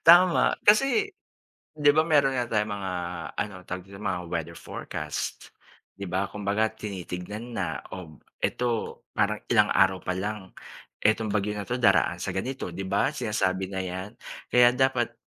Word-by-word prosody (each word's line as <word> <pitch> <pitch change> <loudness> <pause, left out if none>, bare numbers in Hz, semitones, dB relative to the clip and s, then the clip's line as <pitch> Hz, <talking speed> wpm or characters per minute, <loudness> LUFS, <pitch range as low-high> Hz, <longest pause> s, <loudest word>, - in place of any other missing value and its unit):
Tama 175 +1 +7
kasi, 270 - +5 0.7
'di 150 -1 +4
ba 155 - +5
meron 140 -4 +4
nga 120 -1 0
tayong 105 -1 0
mga 95 -2 -4 0.4
ano 105 - -2
tawag 90 0 -5
dito 100 0 -12
mga 90 -4 -1
weather 85 0 -4
forecast 75 -1 -5 0.4
'di 100 - -6
ba 95 +2 0
kumbaga 105 +2 0
tinitignan 105 +2 -6
na 80 -7 -2
o 80 -5 -9 0.2
eto 120 -2 -1
parang - - +1
ilang - - +5
araw 95 -1 +4
pa 90 - -1
lang 100 0 -4 0.5
etong 110 +1 +3
bagyo 105 0 0
na 100 - -3
'to 125 - -1
daraan 100 -6 +4
sa - - -3
ganito 130 +7 -3
'di 95 - -4
ba, 100 +7 +2
sinasabi 95 -7 0
na 95 - -2
'yan 95 +2 -5 0.4
kaya 125 0 +8
dapat 125 -3 +2
105 Hz, 155 wpm, -27 LUFS, 95-120 Hz, 0.7 s, kaya